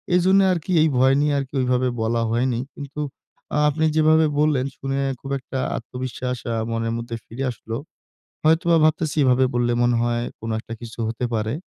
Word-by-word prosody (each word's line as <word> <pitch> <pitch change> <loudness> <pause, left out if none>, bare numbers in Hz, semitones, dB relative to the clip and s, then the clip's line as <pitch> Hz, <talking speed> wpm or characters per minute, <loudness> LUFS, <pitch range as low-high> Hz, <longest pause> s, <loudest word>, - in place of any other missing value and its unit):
এজন্য 185 +2 +4
আরকি 180 0 -2
এই 160 - +5
ভয় 130 +1 +5
নিয়ে 150 0 +2
আরকি 135 -1 -6
ওইভাবে 125 0 +1
বলা 115 +1 +1
হয়নি। 120 +1 +1 0.2
কিন্তু 145 +1 -8 0.6
আ - - +2
আপনি 155 +2 0
যেভাবে 155 0 +5
বললেন, 150 -4 +2
শুনে 135 0 -3 0.2
খুব 135 - -7
একটা 130 0 -5 0.2
আত্মবিশ্বাস 125 +1 -4 0.2
আ - - -1 0.2
মনের 115 0 -1
মধ্যে 115 0 -5
ফিরে 125 +4 -6
আসলো। 115 -1 -6 0.7
হয়তোবা 165 +1 +4
ভাবতেছি 155 0 0
এভাবে 130 0 +4
বললে, 120 0 +2
মনে 120 0 +3
হয় 120 0 0 0.2
কোন 115 - -6
একটা 115 - -8
কিছু 115 0 -9
হতে 115 +2 -2
পারে। 110 0 -1
130 Hz, 175 wpm, -22 LUFS, 120-150 Hz, 0.7 s, এই